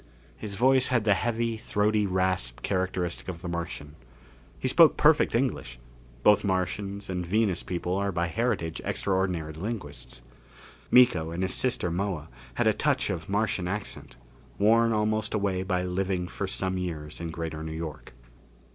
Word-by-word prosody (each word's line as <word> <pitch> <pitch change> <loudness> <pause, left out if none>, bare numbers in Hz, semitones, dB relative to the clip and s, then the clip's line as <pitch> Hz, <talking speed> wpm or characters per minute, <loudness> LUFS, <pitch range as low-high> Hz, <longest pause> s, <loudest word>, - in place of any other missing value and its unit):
His 105 -2 -6
voice 130 +3 +4
had 120 -4 +1
the 105 -1 +4
heavy, 115 +2 -1
throaty 105 -1 +1
rasp 90 -11 -1
characteristic 90 -2 -2
of 90 -2 -6
the - - -4
Martian. 85 -4 -5 0.6
He - - -2
spoke - - +6
perfect - - +4
English - - -1 0.5
both 105 -1 +5
Martians 100 +1 -2
and 90 -1 -2
Venus 100 +1 +1
people 90 0 -3
are 100 0 0
by 85 -1 0
heritage 90 -3 -1
extraordinary 95 -5 -1
linguists. 75 - -6 0.7
Miko 110 -11 +5
and 85 +3 -3
his 95 - -1
sister 125 -9 0
Moa, 90 -4 -2 0.3
had - - +1
a - - +5
touch - - +1
of 80 +2 -5
Martian 100 -3 0
accent, 100 +2 -5 0.4
worn 115 +3 +4
almost 110 0 0
away 100 -3 0
by 90 -1 -1
living 90 0 -1
for 100 - -4
some 95 0 -2
years 80 -4 -5
in 85 - -4
Greater 80 -1 -5
New 80 - -5
York. 80 -5 -6
95 Hz, 155 wpm, -27 LUFS, 85-105 Hz, 0.7 s, spoke